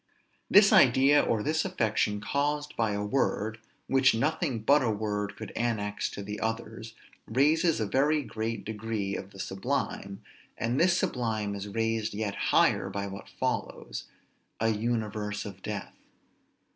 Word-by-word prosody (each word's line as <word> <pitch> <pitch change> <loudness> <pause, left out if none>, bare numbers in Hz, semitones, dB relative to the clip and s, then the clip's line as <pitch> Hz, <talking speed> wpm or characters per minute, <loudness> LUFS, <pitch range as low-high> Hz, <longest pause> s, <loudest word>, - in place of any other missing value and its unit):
This 200 +1 +7
idea 140 - +6
or 110 -2 0
this 155 +2 +1
affection 110 - 0
caused 145 +4 -1
by 110 -3 +1
a 100 0 -2
word, 110 -2 0 0.3
which 135 -2 +4
nothing 145 +1 0
but 145 +6 +5
a 120 - +1
word 105 -1 -2
could 110 - -8
annex 105 -4 -1
to 100 - -7
the 105 +1 -5
others, 115 0 -4 0.3
raises 150 +7 +3
a 110 - 0
very 145 +7 +2
great 110 -2 -4
degree 105 -2 -3
of 95 - -6
the 100 - -15
sublime, 100 -1 -3 0.3
and 120 +4 0
this 180 +1 +4
sublime 110 -7 -1
is 100 0 -5
raised 115 0 -1
yet 105 -1 -2 0.2
higher - - +3
by 100 0 -3
what 100 0 -8
follows, - - -3 0.5
a 115 - +2
"universe 110 -2 -2
of 100 -2 -9
death." 105 0 -5
110 Hz, 145 wpm, -29 LUFS, 105-135 Hz, 0.5 s, This